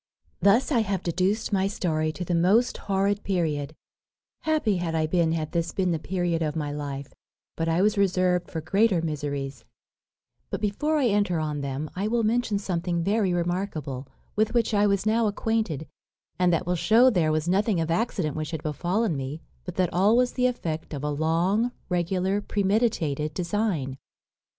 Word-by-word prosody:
"Thus 225 +9 +4
I 250 - +4
have 195 -4 -1
deduced 190 +6 0
my 195 0 +2
story 155 -5 -1
to 180 - -5
the 175 - -1
most 190 +9 +3
horrid 200 +1 +1
period; 155 -6 -1 0.6
happy 300 -11 +1
had 170 -2 -2
I 160 -1 +2
been 165 0 +2
had 155 -2 -2
this 170 -1 -1
been 185 -2 +1
the 165 - 0
period 175 -1 -1
of 155 -1 -1
my 150 -2 -2
life, 140 -1 -5 0.4
but 165 0 -1
I 165 +3 +2
was 210 0 +2
reserved 180 -2 +2
for 160 - -4
greater 195 +1 +2
miseries; 140 -3 -3 0.9
but - - -3
before 295 +10 0
I 285 - +2
enter 205 -5 +2
on 150 -2 -2
them 140 +2 -3
I 195 +3 -1
will 230 +1 +1
mention 225 -1 +1
something 175 -3 -1
very 200 0 +1
remarkable, 170 -7 -2 0.3
with 220 +2 +1
which 230 -1 +2
I 205 0 +4
was 200 0 +1
now 220 +1 +3
acquainted, 205 -8 -1 0.5
and 180 -1 +4
that 170 +1 +1
will 180 +1 0
shew 230 +8 +5
there 165 -7 +2
was 155 +1 0
nothing 195 +1 +2
of 165 0 -1
accident 170 - 0
which 155 -1 -3
had 160 -2 -5
befallen 175 +6 0
me, 135 +4 -5 0.2
but 180 - -6
that 185 -2 0
all 200 +6 +4
was 250 0 +3
the 250 -1 +2
effect 160 -10 -4
of 140 - -6
a 150 - -1
long, 175 - +1 0.2
regular, 185 +3 0
premeditated 195 - 0
design. 170 -8 -1
180 Hz, 180 wpm, -26 LUFS, 160-205 Hz, 0.9 s, shew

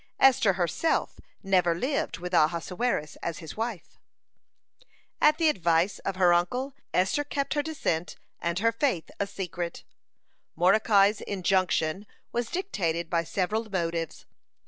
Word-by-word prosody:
Esther 250 -7 +5
herself 180 - 0 0.2
never 180 -3 +3
lived 270 - -1
with 180 +1 -6
Ahasuerus 170 +2 0
as 170 -2 -4
his 160 -2 -9
wife. 225 -4 -5 0.8
(80) - - -26 0.3
At 305 0 +5
the 330 - +3
advice 170 - +1
of 195 - -3
her 180 -2 +5
uncle, 250 +11 0 0.2
Esther 190 +11 +1
kept 285 -1 -2
her 295 - +1
descent 290 - -2 0.2
and 170 0 -2
her 230 +4 +3
faith 230 - -1
a 200 - 0
secret. 175 -3 -5 0.7
Mordecai's 200 +3 +4
injunction 185 -1 0 0.2
was 235 -1 -2
dictated 170 - -2
by 170 -1 +2
several 210 +6 -2
motives. 170 -4 -3
190 Hz, 130 wpm, -27 LUFS, 170-230 Hz, 0.8 s, Esther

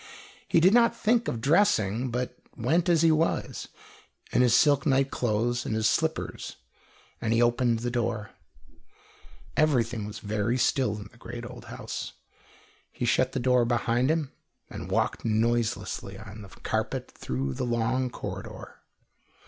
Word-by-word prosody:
He - - +4
did 185 +5 +5
not 235 -1 +5
think 230 +1 +2
of 115 - -2
dressing, 130 - +2
but 125 +1 -3 0.2
went 165 +10 +1
as 165 -2 +4
he 165 - +6
was, 155 +1 0 0.6
in - - +3
his 125 -2 +5
silk 140 +1 +4
night 135 0 +2
clothes 120 +1 0
and 110 - -2
his 110 0 +2
slippers, - - -1 0.7
and 110 - -1
he 115 - +2
opened 120 0 +3
the 120 0 -2
door. 115 -4 -2 1.2
Everything 120 -8 +1
was 105 0 -7
very 110 +3 -1
still 130 -4 +1
in 100 -1 -9
the 120 - -21
great 120 0 -7
old 120 0 -10
house. - - -6 0.8
He - - -3
shut 130 +2 +2
the 135 - -1
door 125 0 +3
behind 120 +2 +1
him 155 -4 0 0.4
and - - -7
walked - - 0
noiselessly 110 -3 0
on 105 +1 -10
the 100 - -11
carpet - - -3
through 65 +1 -3
the - - -3
long 120 +2 0
corridor. - - -8
120 Hz, 150 wpm, -27 LUFS, 110-135 Hz, 1.2 s, he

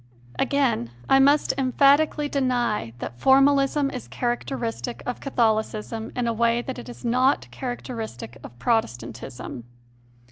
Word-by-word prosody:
Again, 265 - +1 0.2
I 270 - +5
must 285 +2 +4
emphatically 285 +3 +3
deny 245 - 0
that 120 0 -7
formalism 275 +1 +4
is 255 - -7
characteristic 240 -1 -3
of 245 - -3
Catholicism 220 -3 -1
in 245 - -1
a 230 - 0
way 235 +1 +1
that 260 -1 -5
it 245 - -9
is 245 - -10
not 255 +3 +2
characteristic 225 - -6
of 120 - -11
Protestantism. 120 - -3
245 Hz, 120 wpm, -24 LUFS, 220-270 Hz, 0.2 s, I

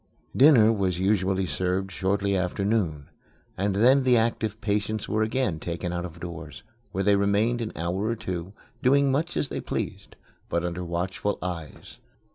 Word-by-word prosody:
Dinner 125 -6 +7
was 95 -4 0
usually 95 0 +1
served 95 +2 -1
shortly 100 +2 0
after 95 +1 -1
noon, 85 -10 -1 0.4
and 100 +1 0
then 130 +7 +5
the 125 -2 +4
active 110 -2 0
patients 105 0 -1
were 110 +1 0
again 110 -6 0
taken 85 +2 -4
out 85 0 -2
of 85 -1 -9
doors, 85 -1 -8 0.3
where 95 - -1
they 100 +1 +4
remained 105 +4 +2
an 110 - -3
hour 90 +5 -2
or 115 +1 0
two 95 -3 -5 0.3
doing 140 +1 +4
much 155 +6 -1
as 140 - 0
they - - -4
pleased, - - -5 0.3
but 85 0 0
under 90 +1 -3
watchful 90 +4 -2
eyes. 85 -5 -7
100 Hz, 165 wpm, -26 LUFS, 90-110 Hz, 0.4 s, Dinner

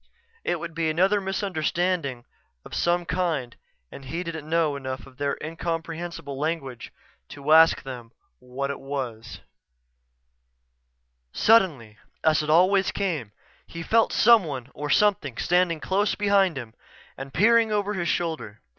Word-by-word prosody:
It 175 - -1
would 165 0 -6
be 165 -1 -1
another 190 +6 +2
misunderstanding 180 - -2 0.4
of - - -12
some 175 0 +1
kind 165 -9 -2 0.4
and 135 - -11
he 165 +6 -4
didn't 160 -3 -7
know 160 -3 +1
enough 130 -1 -6
of 130 -1 -17
their 140 -1 -1
incomprehensible 165 -2 -5
language 140 -6 -4 0.4
to 145 +1 -4
ask 160 +1 +6
them 125 -4 -8 0.3
what 130 +2 -4
it 140 - -6
was 130 -5 -6 1.9
Suddenly, 150 - +3 0.2
as 155 -1 +3
it 150 - -5
always 185 +4 +4
came, 160 - -3 0.4
he 165 0 -7
felt 225 +6 +3
someone 155 - +3
or 150 0 -5
something 195 - +2
standing 175 -2 +1
close 200 +5 0
behind 200 -5 +2
him 115 -4 -7 0.4
and 135 0 -8
peering 225 - +4
over 205 0 0
his 175 -4 -2
shoulder. 160 -13 -3
165 Hz, 135 wpm, -25 LUFS, 140-185 Hz, 1.9 s, ask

